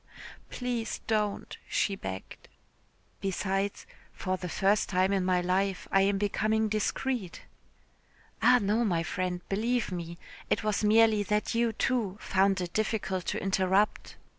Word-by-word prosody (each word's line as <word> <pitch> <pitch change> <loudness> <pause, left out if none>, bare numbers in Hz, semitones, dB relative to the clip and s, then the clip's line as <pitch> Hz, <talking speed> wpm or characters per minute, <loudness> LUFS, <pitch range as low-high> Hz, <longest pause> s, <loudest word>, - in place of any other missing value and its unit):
"Please 245 -2 -3
don't," 210 -2 -1
she 200 - +1
begged. 95 - -8 0.7
"Besides, 195 +1 -2 0.3
for 185 -1 -2
the 180 -1 -6
first 200 +5 +2
time 185 +1 +2
in 195 -2 +1
my 180 -1 +2
life 190 +1 0
I 195 - +5
am 195 0 +2
becoming 215 +2 +1
discreet." 215 -1 -2 1.0
"Ah, 250 +2 +6
no, 210 +3 +1
my 175 -7 +1
friend, 180 +1 -2
believe 230 +3 0
me. 170 -1 -5 0.3
It - - +1
was 215 0 0
merely 220 0 +5
that 210 +1 0
you, 230 0 +2
too, 220 -4 -1
found 195 0 +2
it 175 -1 -5
difficult 195 -4 -1
to - - -2
interrupt." 195 +1 +1
200 Hz, 140 wpm, -29 LUFS, 185-215 Hz, 1.0 s, Ah